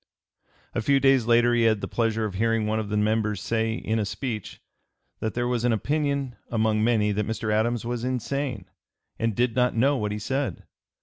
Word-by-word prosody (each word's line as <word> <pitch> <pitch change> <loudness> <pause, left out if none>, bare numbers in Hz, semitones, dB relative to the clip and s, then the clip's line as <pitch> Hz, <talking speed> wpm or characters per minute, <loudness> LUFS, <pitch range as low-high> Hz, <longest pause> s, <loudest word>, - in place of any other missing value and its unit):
A 120 - -1
few 140 +4 +3
days 135 -4 +4
later 120 0 +4
he 120 - +3
had 110 -2 +3
the - - -4
pleasure 115 -1 0
of 105 - -4
hearing 115 +2 +1
one 110 +1 0
of 105 -2 -4
the 105 - 0
members 105 -1 +1
say, 110 +1 0
in 110 -1 -1
a - - +1
speech, 110 0 -5 0.6
that 110 - -3
there 120 0 0
was 120 -2 -1
an 120 - +3
opinion 140 +2 -1
among 110 -2 +1
many 110 -3 +2
that 105 0 -1
Mr. 110 -1 -2
Adams 115 +2 0
was 120 0 -3
insane 130 -3 -2 0.5
and 115 -2 0
did 120 0 +1
not 125 -1 +2
know 135 +5 +3
what 105 -3 -2
he 105 - -2
said. 135 +6 -2
115 Hz, 200 wpm, -25 LUFS, 110-125 Hz, 0.6 s, days